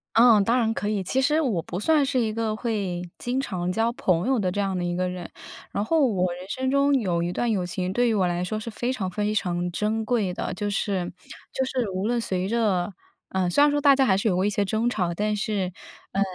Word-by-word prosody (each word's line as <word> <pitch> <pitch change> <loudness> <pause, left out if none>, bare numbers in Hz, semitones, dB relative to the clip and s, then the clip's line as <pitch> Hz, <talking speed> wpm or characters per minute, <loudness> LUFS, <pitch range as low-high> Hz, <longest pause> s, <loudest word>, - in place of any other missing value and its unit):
嗯， 230 -3 +7
当 235 +5 +2
然 225 -2 +2
可 205 - -2
以。 210 -2 0
其 255 +8 0
实 300 +4 +3
我 220 - 0
不 175 - -5
算 300 +6 +3
是 265 -1 0
一 225 -3 +1
个 225 -1 -1
会 200 -7 -2 0.2
经 250 +2 -1
常 180 -9 -2
交 225 +5 +1
朋 180 -5 +1
友 265 -1 +2
的 190 -4 0
这 205 +3 -2
样 195 -2 -1
的 180 - -2
一 175 0 -1
个 185 0 0
人， 180 -1 -6 0.4
然 200 - -1
后 315 +5 +3
我 185 -6 0
人 180 +2 -10
生 260 +4 -1
中 280 +1 +3
有 180 -7 0
一 175 +1 -1
段 240 +5 0
友 195 -5 0
情 180 +1 -3
对 245 +4 +2
于 225 - +2
我 190 -3 +2
来 175 0 -1
说 195 +4 -2
是 215 - -6
非 240 +3 -2
常 200 -7 -3
非 210 +2 -1
常 175 -3 -1
珍 215 +5 -1
贵 215 -5 0
的， - - -3
就 205 +3 -3
是 195 -3 -1 0.4
就 265 - 0
是 255 -4 -1
无 185 +2 -2
论 240 0 +1
随 185 -4 -1
着， 205 -5 +1 0.4
呃， 190 -1 0
虽 230 +11 +4
然 295 - +6
说 290 0 +1
大 280 -1 +6
家 270 0 +3
还 190 - +4
是 200 - -1
有 190 - +2
过 185 +2 +1
一 205 - +2
些 205 0 0
争 220 +4 0
吵， 180 -7 -1
但 210 +3 0
是， 200 -4 -1 0.4
呃， 195 - 0
210 Hz, 275 characters per minute, -25 LUFS, 185-240 Hz, 0.4 s, 嗯